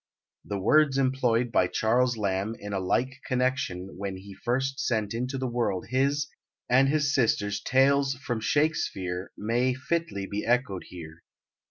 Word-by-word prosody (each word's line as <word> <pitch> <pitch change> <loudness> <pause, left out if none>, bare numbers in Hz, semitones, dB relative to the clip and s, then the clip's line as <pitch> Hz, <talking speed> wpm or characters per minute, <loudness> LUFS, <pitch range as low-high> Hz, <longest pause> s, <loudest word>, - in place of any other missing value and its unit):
The 100 - -4
words 140 +7 +4
employed 125 -3 +1
by 90 -4 +3
Charles 125 +5 +1
Lamb 100 +1 -1
in 100 0 -7
a 100 - 0
like 130 +8 -1
connection 125 -9 -1
when 100 -1 -4
he 100 +1 -11
first 130 +6 -1
sent 110 -3 0
into 125 +3 -2
the 130 - -2
world 120 -7 -1
his 140 +3 +1 0.4
and 130 +2 +4
his 145 -1 +1
sister's 105 -6 +1
"Tales 135 +1 +3
from 125 -3 -3
Shakespeare" 100 - -1
may 120 +4 +1
fitly 140 -6 -2
be 100 +1 -4
echoed 120 -6 0
here. 80 -2 -10
120 Hz, 150 wpm, -27 LUFS, 100-135 Hz, 0.4 s, words